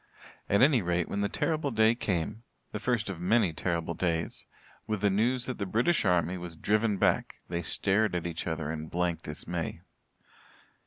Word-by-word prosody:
At 100 +4 +5
any 135 -4 +5
rate, 85 -1 0
when 100 - -2
the 100 - +1
terrible 155 -3 0
day 110 -2 +4
came 105 -1 -2 0.3
the - - -4
first 120 -4 0
of 95 -4 -5
many 100 -1 +3
terrible 85 0 -1
days 85 -1 -1 0.4
with 105 -3 -2
the 100 -1 +3
news 120 +5 +2
that 130 - -4
the 100 - -2
British 120 - +2
army 90 0 +2
was 85 -1 -6
driven 105 +4 +1
back - - +1
they 85 0 -1
stared 100 +4 +1
at 85 - -2
each 85 0 -3
other 80 -2 -2
in 80 0 -5
blank 85 0 -1
dismay. 85 +2 -4
95 Hz, 175 wpm, -29 LUFS, 85-110 Hz, 0.4 s, At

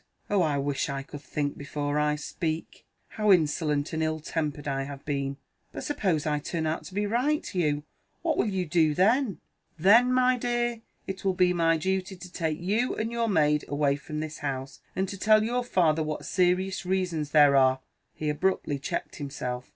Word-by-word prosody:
"Oh, 200 -2 +3
I 150 -4 +1
wish 140 0 -1
I 140 0 -3
could 145 0 -10
think 145 0 -3
before 145 +1 -2
I 150 0 +2
speak: 160 +2 -4 0.2
how 210 -1 +2
insolent 150 -3 +2
and 160 - -1
ill 155 0 0
tempered 150 -2 -3
I 135 -1 -1
have 140 0 -7
been! 140 -2 -2 0.3
But - - -6
suppose 185 - 0
I 150 -1 +1
turn 160 +2 -3
out 155 +1 -2
to 185 - -10
be 205 +1 +1
right, 255 +8 +1
Hugh, 150 -5 0 0.4
what - - +1
will - - +1
you 190 -3 -1
do 155 -2 +2
then?" 220 - +3 0.4
"Then, 225 +9 +6
my 255 0 +3
dear, 240 -1 -1 0.2
it 190 0 -6
will 190 -1 +1
be 180 -1 +3
my 165 -1 +3
duty 190 +3 -1
to 180 0 -11
take 160 -3 -2
you 210 +8 0
and 225 +1 -2
your 235 -1 0
maid 150 -5 +3
away 145 -1 +1
from 150 +2 -5
this 155 0 -6
house, 135 -1 -4 0.2
and 190 +1 0
to 195 0 -7
tell 215 +1 +5
your 245 +2 0
father 165 -9 +2
what 155 -1 -3
serious 185 +1 +1
reasons 180 -5 -1
there 145 -2 +6
are" 130 -1 +4 0.4
He 155 - -4
abruptly 150 -1 0
checked 170 +5 -4
himself. 125 -4 -5
160 Hz, 190 wpm, -27 LUFS, 145-190 Hz, 0.4 s, Then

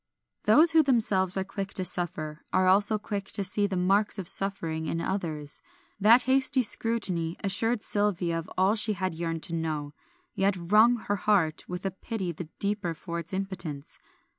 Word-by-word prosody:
Those 325 +2 +6
who 320 - +5
themselves 210 - +1
are 190 - 0
quick 195 +1 -6
to 185 - -2
suffer, 155 -4 -3
are 185 0 +2
also 205 +3 +3
quick 205 -1 -5
to 200 - -1
see 205 +2 -1
the 195 - -4
marks 195 +4 +2
of 190 -3 -5
suffering 165 -5 +2
in 165 - -2
others; 160 -6 -2 0.4
that 225 +5 +6
hasty 265 0 +2
scrutiny 190 -8 +2
assured 215 +4 0
Sylvia 185 -5 -1
of 165 - -9
all 190 +2 +3
she 215 -1 0
had 185 -2 -3
yearned 165 -1 -4
to 170 - -3
know, 155 -3 -3 0.4
yet 195 0 0
wrung 210 +7 +4
her 205 - -1
heart 185 -7 0
with 180 +2 -6
a 195 - -1
pity 190 -1 -5
the 165 -1 -9
deeper 200 -4 -2
for 170 +1 -6
its 165 -1 -8
impotence. 190 -7 -4
190 Hz, 175 wpm, -27 LUFS, 170-210 Hz, 0.4 s, Those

